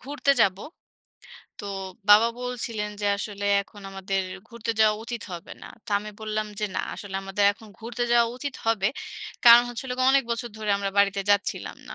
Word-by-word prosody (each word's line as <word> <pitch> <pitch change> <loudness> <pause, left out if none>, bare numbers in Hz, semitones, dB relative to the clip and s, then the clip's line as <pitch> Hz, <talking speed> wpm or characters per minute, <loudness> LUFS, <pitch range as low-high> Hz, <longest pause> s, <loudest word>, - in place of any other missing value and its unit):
ঘুরতে 280 +1 -1
যাব। 190 -3 +4 1.0
তো - - -8 0.5
বাবা 215 +3 +8
বলছিলেন 235 -4 -3
যে 205 - 0
আসলে 205 0 -5 0.2
এখন 205 +1 -16
আমাদের 195 0 -2 0.3
ঘুরতে 230 -1 -4
যাওয়া 215 -1 +5
উচিত 235 -1 -5
হবে 170 -1 -8
না। - - -9 0.2
তো 235 - -11
আমি 210 +1 -8
বললাম 215 0 -2
যে - - +1
না, - - +2
আসলে 200 -2 -9
আমাদের 195 +1 0
এখন 220 +2 -16
ঘুরতে 235 +2 -3
যাওয়া 235 -1 +5
উচিত 280 +1 -5
হবে। 215 -3 +2 0.6
কারণ 235 0 +10
হচ্ছে 240 -1 -5
হলো 250 - -3
গে 255 - +2
অনেক 275 -1 +4
বছর 235 +1 -2
ধরে 215 -1 -2
আমরা 200 0 -2
বাড়িতে 200 0 +3
যাচ্ছিলাম 205 0 0
না। - - -7
215 Hz, 185 wpm, -25 LUFS, 200-235 Hz, 1.0 s, কারণ